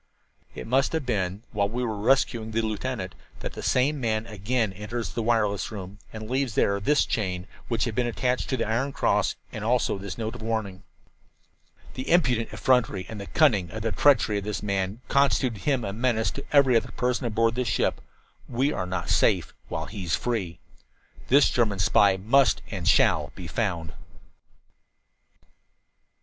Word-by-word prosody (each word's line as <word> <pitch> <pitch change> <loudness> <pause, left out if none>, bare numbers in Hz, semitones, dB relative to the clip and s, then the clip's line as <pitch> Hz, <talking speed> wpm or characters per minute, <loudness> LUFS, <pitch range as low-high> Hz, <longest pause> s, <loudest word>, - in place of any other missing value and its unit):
"It 60 - -6
must 135 +5 +1
have 160 -4 -1
been 100 -3 -2
while 100 -2 0
we 125 +3 -2
were 110 -3 -2
rescuing 115 0 +1
the 115 +1 -1
lieutenant 110 -2 -3 0.3
that - - -5
the - - -7
same 135 +3 +1
man 110 -2 0
again 110 0 -1
enters 105 +4 -5
the 115 - -3
wireless 110 -3 +1
room 100 -1 -8
and 110 -1 -7
leaves 130 -2 -1
there 100 0 +2
this 145 +9 +2
chain, 90 -4 -2 0.2
which 115 -3 0
had 115 - -1
been 120 +2 0
attached 125 +1 -1
to 130 - 0
the 115 - -1
iron 130 +5 -1
cross, - - +1 0.2
and 110 - -6
also 115 -3 +1
this 100 0 -6
note 110 -1 -3
of 120 - -9
warning. 110 -4 -3 1.1
"The 130 - -5
impudent 125 -10 +2
effrontery 110 -8 +1
and 105 -2 -6
the 100 - -8
cunning 110 - +3
treachery 110 +1 +2
of - - -8
this 105 0 -4
man 100 +2 -2
constitute 130 -5 +2
him 135 -5 +1
a 100 - -3
menace 115 0 0
to 140 - -7
every 140 -4 +5
other 115 - +2
person 125 0 -1
aboard 115 0 +1
this 125 +1 -2
ship. 100 - 0 0.5
We 130 +4 +1
are 90 - -3
not 90 -5 -3
safe - - +2
while - - -3
he 95 -3 -7
is 80 - +1
free. 95 -9 -3 0.7
"This 140 +2 +5
German 110 -5 +1
spy 95 0 +4
must 125 +8 +3
and - - -4
shall - - +3
be - - -8
found." 80 -2 -2
110 Hz, 170 wpm, -26 LUFS, 100-125 Hz, 1.1 s, every